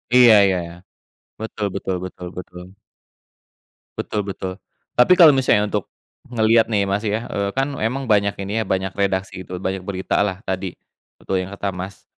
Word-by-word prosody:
Iya 125 -2 +8
iya 95 -1 +2
iya. 85 - -10 0.7
Betul 110 -1 -4
betul 95 -1 -2
betul 90 -1 -8
betul. 90 0 -8 1.3
Betul 105 - -2
betul. 95 0 -6 0.3
Tapi 125 +9 +6
kalau 160 -5 +9
misalnya 130 -6 +3
untuk 105 -2 -3 0.4
ngelihat, 115 -1 +3
nih, 100 -3 +2
Mas, 100 +1 -1
ya, 110 +1 -2
eee, 100 0 -1
kan 135 - +3 0.2
emang 130 +5 -1
banyak 100 -3 +2
ini, 105 +3 -1
ya, - - 0
banyak 95 0 -1
redaksi, 95 -1 -1
gitu, 90 0 -7
banyak 95 +1 -3
berita 95 +1 -1
lah 95 -2 0
tadi, 95 -1 -3 0.4
betul 95 -1 -2
yang 90 - -6
kata 100 -1 -4
Mas. 95 +1 -8
100 Hz, 165 wpm, -21 LUFS, 95-110 Hz, 1.3 s, kalau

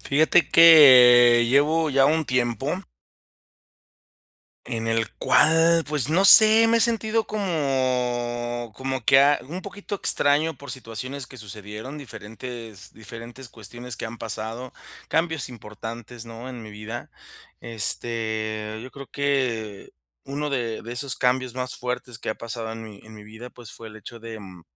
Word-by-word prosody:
Fíjate 155 +2 +2
que 125 -8 +7
llevo 150 +4 +2
ya 135 0 +3
un 160 +2 +1
tiempo 120 -4 -2 1.9
en 115 -1 -4
el 115 -1 -1
cual, 165 +2 +4
pues, 145 -4 -2
no 175 +5 +2
sé, 220 +3 +7
me 230 - +3
he - - +2
sentido 225 -1 +1
como 125 - -2
como 130 -2 -4
que 135 - +5
a 145 +1 +3
un 175 +4 -6
poquito 200 +1 -7
extraño 155 -2 +1
por 140 +1 -11
situaciones 130 +2 -6
que 130 - -14
sucedieron, 105 +5 -9
diferentes 115 -3 -10
diferentes 115 +3 -11
cuestiones 120 +2 -8
que - - -5
han 115 +1 -10
pasado, 115 +3 -6 0.4
cambios 160 -4 -1
importantes, 115 +1 -10
¿no? 115 +2 -9
En 125 -3 -9
mi 110 - -11
vida. 105 +3 -8 0.5
Este, 110 -1 -2
yo 125 +2 -11
creo 140 -1 -11
que 125 -8 -2 0.4
uno 145 +2 -4
de 120 -5 -3
de 115 - -8
esos 130 +1 -4
cambios 125 -1 -1
más 125 0 -4
fuertes 125 -1 -6
que - - -4
ha - - -5
pasado 115 -1 -6
en 115 0 -8
mi 105 -2 -12
en 110 0 -14
mi 105 - -13
vida, 110 +4 -12
pues, 115 -4 -13
fue 115 - -11
el 110 - -13
hecho 115 +2 -12
de 115 -1 -9
mm, 95 -4 -13
120 Hz, 155 wpm, -23 LUFS, 115-140 Hz, 1.9 s, que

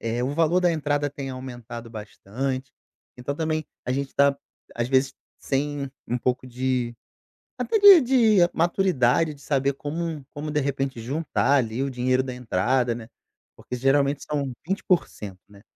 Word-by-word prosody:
eh, 115 +1 -2
o 135 +3 -1
valor 165 +3 +3
da 175 -1 +3
entrada 145 -2 0
tem 140 -1 -6
aumentado 120 -2 -8
bastante, 130 +5 -5 0.5
então 125 +3 -4
também 155 0 -1 0.2
a 125 - 0
gente 140 0 -3
tá, 140 0 +4 0.4
às 120 +1 -1
vezes, 130 0 +2 0.3
sem 140 0 -2 0.2
um 120 - -1
pouco 125 +1 -1
de 125 -1 -1 0.6
até 445 - +1
de 400 -4 +10
de 240 -5 +4 0.2
maturidade, 165 -4 +2
de 140 - -18
saber 140 -1 +1
como 155 0 -4
como, 150 +1 -5
de 150 0 +1
repente, 135 -3 -2
juntar 140 +3 0
ali 120 -1 0
o 140 - -1
dinheiro 130 +1 +1
da 130 -1 -5
entrada, 125 +1 0
né, 115 -1 -9 0.5
porque 125 - -6
geralmente 140 +2 +2
são 140 -3 -2 0.2
20%, 170 - -1
né, 100 -1 -17
135 Hz, 155 wpm, -25 LUFS, 125-150 Hz, 0.6 s, de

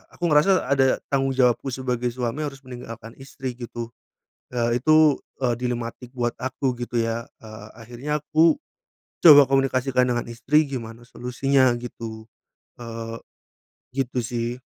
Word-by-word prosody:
aku 175 - -3
ngerasa 170 +6 +4
ada 135 -1 +3
tanggung 135 -1 +1
jawabku 125 +1 +2
sebagai 125 -1 -2
suami 125 +4 -3
harus 140 -1 -7
meninggalkan 115 -2 -9
istri, 135 -1 -6
gitu. 120 -1 -6 0.6
Ya 120 -1 0
itu, 155 +3 +5 0.3
eee, 120 -2 +2
dilematik 120 0 -4
buat 120 -1 -1
aku 130 0 -1
gitu 120 0 -2
ya. 115 0 -2 0.2
Eee, 110 -1 -10
akhirnya 125 +6 -4
aku 160 +1 +3 0.7
coba 145 -3 +10
komunikasikan 135 -1 +2
dengan 120 -1 0
istri 150 +6 +2
gimana 120 -3 -7
solusinya 130 +2 +1
gitu, 115 -2 -8 0.6
eee, 115 -1 -6 0.8
gitu 130 -2 -2
sih. 120 +1 -3
125 Hz, 130 wpm, -24 LUFS, 120-135 Hz, 0.8 s, coba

